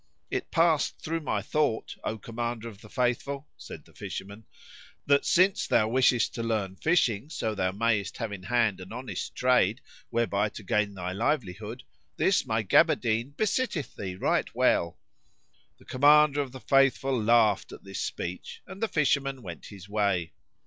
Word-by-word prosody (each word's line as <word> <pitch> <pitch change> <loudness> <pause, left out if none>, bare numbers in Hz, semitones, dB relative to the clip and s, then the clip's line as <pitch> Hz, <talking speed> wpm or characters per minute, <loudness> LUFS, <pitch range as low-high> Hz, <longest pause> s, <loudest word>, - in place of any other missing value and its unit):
"It 390 -1 -3
passed 165 -4 +2
through 165 +1 -3
my 115 -10 -2
thought, 145 -2 -1
O 110 - -3
Commander 115 +1 -4
of 105 -2 -11
the 105 - -14
Faithful," 135 +4 -1
said - - -10
the - - -21
fisherman, 100 +3 -7 0.6
"that, 140 0 +3
since 185 +2 +3
thou 110 -1 +3
wishest 125 0 +3
to 115 - -4
learn 110 -5 -2
fishing 135 - +1
so 110 -8 -2
thou 95 -3 0
mayest 105 0 0
have 115 -3 -4
in 100 -2 -6
hand 110 -2 +1
an 95 +2 -10
honest 125 +2 -5
trade 125 -3 +3 0.3
whereby 110 -3 0
to 105 - -10
gain 105 +1 0
thy 90 -1 -4
livelihood, 110 0 -2 0.3
this 190 -8 +2
my 110 -1 0
gaberdine 115 +6 +2
besitteth 215 - -1
thee 95 -2 -5
right - - 0
well."[FN#57] 85 -1 -3
The - - -20
Commander 145 +2 +5
of 135 -3 -5
the 130 0 -10
Faithful 135 -2 +2
laughed 110 -2 +3
at - - -11
this 95 0 -6
speech, 90 +1 -5
and 190 - -11
the 225 - +2
fisherman 140 - 0
went 85 -6 -8
his 100 -2 -11
way. 100 -5 0
115 Hz, 165 wpm, -28 LUFS, 100-140 Hz, 0.6 s, Commander